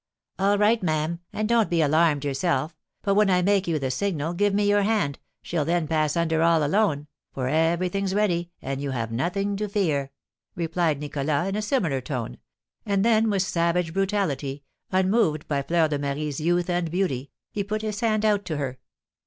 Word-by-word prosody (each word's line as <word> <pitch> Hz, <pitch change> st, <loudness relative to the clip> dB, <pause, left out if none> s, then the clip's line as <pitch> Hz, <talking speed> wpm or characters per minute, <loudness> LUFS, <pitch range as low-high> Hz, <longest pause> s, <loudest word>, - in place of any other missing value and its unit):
"All 200 Hz, +1 st, +3 dB
right, 215 Hz, +2 st, +3 dB
ma'am; 160 Hz, 0 st, -1 dB
and 215 Hz, 0 st, -2 dB
don't 230 Hz, -2 st, +3 dB
be 170 Hz, -, +1 dB
alarmed 155 Hz, -1 st, +3 dB
yourself, 145 Hz, +2 st, -1 dB, 0.3 s
but, 200 Hz, -, +2 dB
when 210 Hz, 0 st, +4 dB
I 180 Hz, -1 st, +3 dB
make 195 Hz, 0 st, +2 dB
you 165 Hz, -2 st, +1 dB
the 135 Hz, -3 st, -2 dB
signal, 165 Hz, -1 st, -1 dB
give 205 Hz, +3 st, +2 dB
me 205 Hz, +1 st, +1 dB
your 205 Hz, 0 st, +4 dB
hand, 200 Hz, -9 st, 0 dB, 0.2 s
she'll 165 Hz, -3 st, -1 dB
then 165 Hz, +1 st, 0 dB
pass 155 Hz, 0 st, +1 dB
under 160 Hz, -1 st, +1 dB
all 165 Hz, -1 st, +4 dB
alone, 150 Hz, -2 st, +1 dB, 0.3 s
for 130 Hz, -2 st, -3 dB
everything's 175 Hz, +6 st, +1 dB
ready, 175 Hz, -5 st, +1 dB
and 135 Hz, +1 st, -3 dB
you 140 Hz, -, -3 dB
have 115 Hz, -4 st, -3 dB
nothing 195 Hz, -, -1 dB
to 210 Hz, 0 st, -3 dB
fear," 155 Hz, -9 st, 0 dB, 0.5 s
replied 165 Hz, -3 st, 0 dB
Nicholas, 145 Hz, +2 st, -1 dB
in 195 Hz, -, -2 dB
a 215 Hz, -, -1 dB
similar 190 Hz, -, 0 dB
tone; 125 Hz, -3 st, -5 dB, 0.4 s
and 200 Hz, -1 st, +1 dB
then, 225 Hz, -1 st, +4 dB
with 195 Hz, -3 st, +1 dB
savage 170 Hz, -3 st, 0 dB
brutality, 165 Hz, -9 st, -1 dB, 0.3 s
unmoved 185 Hz, -4 st, +2 dB
by 140 Hz, -2 st, 0 dB
Fleur 165 Hz, +3 st, +2 dB
de 145 Hz, -2 st, -2 dB
Marie's 145 Hz, 0 st, -3 dB
youth 175 Hz, +2 st, +1 dB
and 175 Hz, -2 st, 0 dB
beauty, 145 Hz, -7 st, -1 dB, 0.2 s
he 205 Hz, -, -2 dB
put 215 Hz, +2 st, -3 dB
his 210 Hz, -2 st, -3 dB
hand 220 Hz, -2 st, +1 dB
out 205 Hz, -2 st, +2 dB
to 160 Hz, -4 st, -3 dB
her. 130 Hz, -3 st, -4 dB
170 Hz, 185 wpm, -25 LUFS, 150-200 Hz, 0.5 s, when